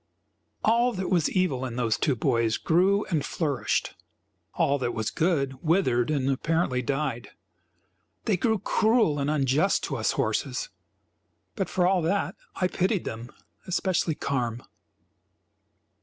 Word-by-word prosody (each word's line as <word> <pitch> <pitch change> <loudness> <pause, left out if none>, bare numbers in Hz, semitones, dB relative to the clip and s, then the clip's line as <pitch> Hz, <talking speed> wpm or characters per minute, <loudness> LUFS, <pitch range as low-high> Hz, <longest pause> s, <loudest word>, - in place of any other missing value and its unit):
All 235 +3 +3
that 190 -2 -3
was 170 -4 +3
evil 180 -9 0
in 125 -3 -4
those 115 -3 +1
two 140 - +1
boys 115 -2 +1
grew 190 +5 +2
and 155 -4 +1
flourished; 140 -10 -1 0.6
all 140 +1 +2
that 120 -2 -2
was 110 -1 -2
good 140 -6 0
withered 155 -8 +2
and, 140 -4 0
apparently, 140 -1 0
died. 135 -2 -2 1.0
They 215 - +2
grew 220 +4 +1
cruel 215 -6 +2
and 140 +1 0
unjust 150 +5 +2
to - - -3
us - - 0
horses, - - -1 0.9
but 195 -4 -2
for 180 - +1
all 185 0 +3
that, 190 +5 0 0.2
I 185 - +1
pitied 185 +1 0
them, 115 +2 -6 0.4
especially 180 -3 0
Carm. 120 -5 -2
155 Hz, 135 wpm, -26 LUFS, 130-185 Hz, 1.0 s, All